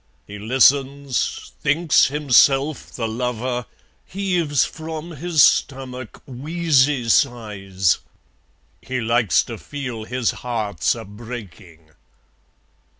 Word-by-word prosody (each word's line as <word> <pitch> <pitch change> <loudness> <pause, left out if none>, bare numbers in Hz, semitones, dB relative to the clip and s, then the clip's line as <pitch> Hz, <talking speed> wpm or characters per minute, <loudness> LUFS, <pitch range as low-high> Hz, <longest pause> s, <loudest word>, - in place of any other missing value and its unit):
He 105 0 -9
listens, 140 - +1
thinks 150 +3 +3
himself 140 0 +3
the 115 -2 -3
lover, 125 +1 -3 0.4
Heaves 180 -7 0
from 160 +1 -7
his 160 -1 +2
stomach 130 -3 0
wheezy 140 -2 +1
sighs; 105 - +1 0.8
He 130 0 -4
likes 115 -5 +2
to - - -8
feel 125 -6 -6
his 125 -1 -1
heart's 110 - -1
a 115 -1 -8
breaking. 100 -7 -11
125 Hz, 90 wpm, -21 LUFS, 110-145 Hz, 0.8 s, thinks